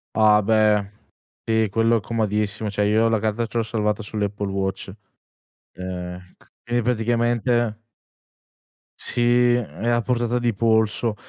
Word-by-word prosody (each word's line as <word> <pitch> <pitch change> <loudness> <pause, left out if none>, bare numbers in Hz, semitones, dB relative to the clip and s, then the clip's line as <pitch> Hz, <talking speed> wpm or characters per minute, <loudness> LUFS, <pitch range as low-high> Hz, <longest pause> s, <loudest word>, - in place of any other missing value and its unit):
Ah 105 -1 +5
beh, 105 -1 +2 0.5
sì, 110 -1 +1
quello 115 +2 +2
è - - -1
comodissimo, 105 -1 -2
cioè 105 0 0
io 110 +2 +3
la 110 -2 +1
carta 110 +2 -1
ce 115 +2 -5
l'ho 115 - +1
salvata 105 -1 -1
sull'Apple 105 -1 -3
Watch. 95 0 -3 0.9
E 90 -1 -6 0.2
c - - -24 0.2
e 120 0 -1
praticamente 120 -1 0 1.2
Sì, 120 0 +2
è 115 -1 -3
a 120 0 +2
portata 120 +1 0
di 120 -3 0
polso. 110 0 +1
110 Hz, 135 wpm, -22 LUFS, 105-120 Hz, 1.2 s, Ah